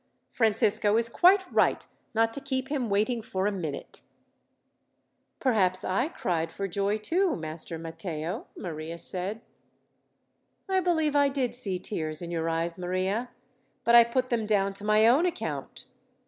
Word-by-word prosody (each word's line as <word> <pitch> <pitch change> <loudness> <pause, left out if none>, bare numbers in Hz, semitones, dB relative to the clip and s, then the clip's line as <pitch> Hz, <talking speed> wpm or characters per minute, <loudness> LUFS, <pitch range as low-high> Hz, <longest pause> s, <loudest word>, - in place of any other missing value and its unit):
Francisco 215 -1 +2
is 230 0 +1
quite 375 +9 +5
right, - - +2 0.3
not 225 0 +2
to 280 - -5
keep 265 -1 -3
him 270 -6 -1
waiting 215 +4 +1
for 190 -3 -3
a 205 - +2
minute." 160 -8 -6 1.4
"Perhaps 190 -8 +2
I 195 +9 0
cried 165 - -2
for 195 +4 -3
joy, 200 +3 0
too, 340 - +1
Master 160 +1 -5
Matteo," 165 +3 -5
Maria 165 -1 -6
said. 190 +6 -4 1.3
"I 380 -1 +2
believe 320 -5 +1
I 285 -1 +5
did 270 -3 -1
see 205 -7 -2
tears 155 -5 -3
in 175 -1 -4
your 165 -1 -1
eyes, 165 +1 -2
Maria; 185 +6 -1 0.5
but 235 0 +3
I 235 0 +10
put 255 +2 -1
them 225 -3 0
down 200 -2 +2
to 200 - -8
my 215 +1 +4
own 275 +10 +5
account. 350 - -5
210 Hz, 150 wpm, -28 LUFS, 180-250 Hz, 1.4 s, I